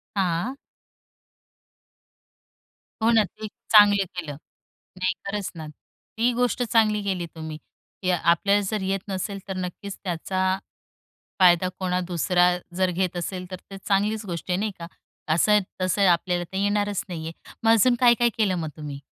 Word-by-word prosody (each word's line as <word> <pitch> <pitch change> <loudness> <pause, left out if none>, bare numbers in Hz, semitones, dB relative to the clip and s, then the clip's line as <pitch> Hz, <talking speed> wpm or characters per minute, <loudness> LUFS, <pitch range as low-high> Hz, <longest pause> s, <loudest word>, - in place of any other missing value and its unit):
हां. 190 +7 0 2.5
हो 230 - +4
ना, 220 -2 +5
ते 200 +3 -11
एक 210 - -7 0.2
चांगलं 205 -2 +7
केलं. 160 -5 -5 0.6
नाही, 185 0 0
खरंच 200 -1 -3
ना, 155 -1 -7
ती 225 +9 -4
गोष्ट 245 +1 +1
चांगली 215 -2 +2
केली 185 -3 -2
तुम्ही, 160 -1 -6 0.5
की 185 - +1
आपल्याला 180 +4 +3
जर 210 -2 -1
येत 195 +1 -1
नसेल 195 +1 -3
तर 190 - -4
नक्कीच 185 +2 -5
त्याचा 185 +2 -1 0.8
फायदा 180 0 +6
कोणा 180 -1 0
दुसरा 180 +1 +3 0.3
जर 185 -1 +2
घेत 180 0 -1
असेल 180 +1 -4
तर 185 - -4
ते 195 - -7
चांगलीच 205 +2 0
गोष्ट 175 +1 -5
आहे 180 - +1
नाही 215 +1 -1
का? 170 - -7 0.5
असं-तसं 190 0 +2
आपल्याला 175 0 +1
तर - - -4
येणारच 205 0 0
नाहीये. 165 -2 -5 0.3
मग 225 - +4
अजून 240 +3 +5
काय-काय 240 -1 +5
केलं 200 -4 +2
मग 160 -2 -3
तुम्ही? 145 -2 -6
190 Hz, 150 wpm, -25 LUFS, 175-205 Hz, 2.5 s, चांगलं